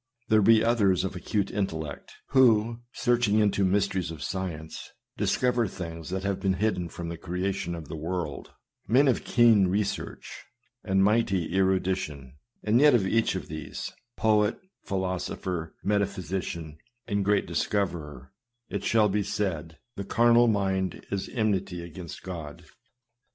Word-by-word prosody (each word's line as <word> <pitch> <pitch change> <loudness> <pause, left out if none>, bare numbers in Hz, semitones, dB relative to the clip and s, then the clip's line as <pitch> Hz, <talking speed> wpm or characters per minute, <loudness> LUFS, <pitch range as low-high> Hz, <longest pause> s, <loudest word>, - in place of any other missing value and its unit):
There 110 -1 +5
be 110 +2 +6
others 100 -6 +3
of 95 0 -3
acute 100 +3 -1
intellect, 80 -8 -4 0.2
who, 115 -3 +4
searching 120 -4 +2
into 100 -2 +2
mysteries 95 -2 +1
of 80 -2 -7
science, 85 -4 -5 0.3
discover 125 -2 +1
things 85 -3 -7
that 95 +1 -3
have 100 -1 -1
been 95 -1 +1
hidden 95 -4 -1
from 85 +1 -6
the 85 - -5
creation 90 0 -2
of 80 -3 -8
the - - -6
world; 80 -2 -4 0.4
men 135 +5 +4
of 130 - +2
keen 115 -5 +5
research, 100 +2 -3 0.4
and 95 -1 +2
mighty 100 -5 +1
erudition; 95 -8 0 0.3
and 110 +3 +3
yet 150 -3 +7
of 105 -5 +2
each 115 +4 +1
of - - -5
these 80 0 -6
— 120 - -56
poet, 105 0 +3 0.3
philosopher, 90 -3 -3
metaphysician, 95 -6 -2 0.3
and 100 -2 0
great 100 0 +2
discoverer 80 -7 -2 0.2
— 120 0 -53
it 100 -1 -3
shall 110 0 +4
be 105 +1 0
said, 85 -6 -3
" 120 - -54
The 100 - -3
carnal 120 +3 +4
mind 95 -3 0
is 100 -1 -2
enmity 100 -6 -1
against 85 0 -9
God." 85 -2 -7
95 Hz, 145 wpm, -27 LUFS, 85-105 Hz, 0.4 s, yet